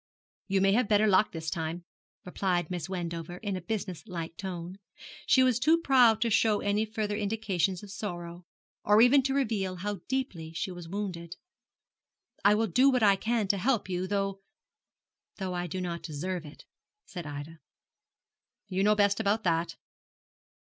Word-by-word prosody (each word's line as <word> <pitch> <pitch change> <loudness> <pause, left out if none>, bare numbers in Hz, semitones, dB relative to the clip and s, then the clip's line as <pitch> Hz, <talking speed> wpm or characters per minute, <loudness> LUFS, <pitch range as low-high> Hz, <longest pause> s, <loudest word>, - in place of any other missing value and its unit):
'You 195 -1 +1
may 195 0 +4
have 220 +2 +2
better 210 0 +4
luck 205 0 +4
this 160 -1 -5
time,' 165 +1 -3 0.4
replied 180 -1 -1
Miss 180 0 -4
Wendover, 170 -2 -4
in 200 0 -3
a 185 - -4
business 185 -1 -4
like 165 -3 -5
tone. 185 0 -6 0.5
She 260 - +5
was 250 -2 +3
too 310 +6 +4
proud 250 -8 +4
to 230 -1 +1
show 215 -1 +3
any 205 +2 0
further 215 -1 -3
indications 200 -4 -1
of 205 - -10
sorrow, 175 -4 -6 0.4
or 210 +1 +5
even 245 +4 +6
to 270 +1 -1
reveal 210 -9 0
how 200 +2 -4
deeply 195 - -3
she 185 - -3
was 175 -2 -9
wounded. 180 -4 -5 1.1
'I 205 +1 +6
will 225 +1 +2
do 255 +9 +4
what 250 -4 +2
I 200 -2 +6
can 225 +1 -1
to 200 - +2
help 235 0 +1
you, 180 0 -2
though 195 -1 -2 0.4
' - - -64
'Though 190 -2 -3
I 175 0 -2
do 185 +3 -4
not 170 -2 -4
deserve 165 +2 -4
it,' 145 - -14 0.4
said 175 -5 -7
Ida. 145 +3 -7 1.1
'You 190 0 -1
know 210 +1 +4
best 200 0 +2
about 220 +1 +1
that. 165 -1 0
195 Hz, 170 wpm, -29 LUFS, 175-215 Hz, 1.1 s, even